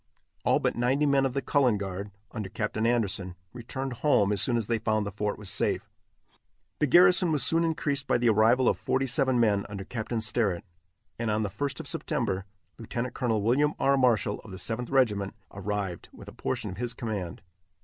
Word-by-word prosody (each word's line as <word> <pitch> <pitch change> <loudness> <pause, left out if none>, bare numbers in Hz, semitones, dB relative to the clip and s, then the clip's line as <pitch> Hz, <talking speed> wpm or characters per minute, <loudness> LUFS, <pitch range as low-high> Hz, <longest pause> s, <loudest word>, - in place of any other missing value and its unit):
All - - +3
but - - 0
ninety 130 +5 +2
men 140 -1 +3
of 130 - -6
the 135 0 -2
Cullen 130 -7 +3
Guard, 100 0 -5 0.2
under 105 -5 -5
Captain 110 +2 -1
Anderson, 100 -6 0 0.2
returned 130 +2 -5
home 105 -9 +3
as 100 - +1
soon 120 -2 +2
as 115 - -1
they 115 +1 0
found 110 -1 0
the 100 - -4
fort 105 +1 -2
was 105 - -9
safe. - - 0 0.9
The 150 - +2
garrison 180 +3 +6
was 150 -3 +1
soon 165 +1 +3
increased 145 -3 -1
by - - +3
the 120 -1 +2
arrival 115 +4 +4
of - - +2
forty 135 +1 0
seven 130 -1 +2
men 105 -4 +3
under 100 -1 -6
Captain 115 +2 -4
Sterritt, 110 -5 0 0.6
and 115 -1 -1
on 110 +1 +1
the 100 - -3
1st 145 - -3
of 150 - -10
September, 120 - -2 0.3
Lieut. 120 +2 -4
Col. 115 -4 0
William 145 +7 +2
R. 140 0 +3
Marshall 120 -6 +2
of - - -13
the 95 - -8
Seventh 115 +4 -3
Regiment 105 -7 +1 0.2
arrived, 100 -3 -4
with - - -13
a - - -8
portion - - -3
of 95 - -8
his 120 +1 -2
command. 100 -7 -5
115 Hz, 200 wpm, -28 LUFS, 105-135 Hz, 0.9 s, garrison